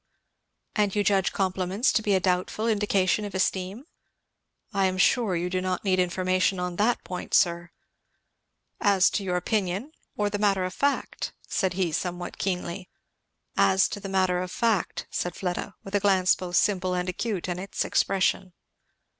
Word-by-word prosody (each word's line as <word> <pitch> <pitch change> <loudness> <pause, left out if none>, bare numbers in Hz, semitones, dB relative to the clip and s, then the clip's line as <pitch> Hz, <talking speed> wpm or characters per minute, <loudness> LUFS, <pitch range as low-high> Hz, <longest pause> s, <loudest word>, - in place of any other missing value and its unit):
"And 205 -2 +1
you 205 - +2
judge 195 -1 +2
compliments 190 +4 0
to - - +2
be 205 -2 +2
a - - +3
doubtful 185 +4 0
indication 205 -2 +2
of 200 -2 -6
esteem?" 190 +6 -1 0.9
"I 195 -1 +3
am 185 0 -2
sure 205 0 +3
you 175 +1 -1
do 185 0 -1
not 185 -1 -2
need 185 -2 +2
information 185 +1 +1
on 180 -1 -3
that 230 +4 +1
point, 180 - -3
sir." 170 -2 +2 1.1
"As 195 -2 +4
to 205 - -1
your 180 -2 -1
opinion, 200 - -1 0.3
or 210 - +1
the 205 - -2
matter 200 -3 +2
of 185 - -4
fact?" 280 +6 -1
said 190 -3 0
he 180 -2 0
somewhat 175 +2 -4
keenly. 180 -1 -3 0.7
"As 190 0 +4
to - - -5
the 195 - -7
matter 185 -2 +1
of 180 0 -5
fact," 225 -7 0
said 175 - -2
Fleda, 180 +1 -3
with 195 - -10
a 205 - +3
glance 190 -2 +4
both 180 -1 -4
simple 185 -2 +2
and 180 0 -2
acute 185 0 -2
in 180 0 -3
its 195 +2 -3
expression. 190 -1 +1
185 Hz, 170 wpm, -26 LUFS, 180-200 Hz, 1.1 s, As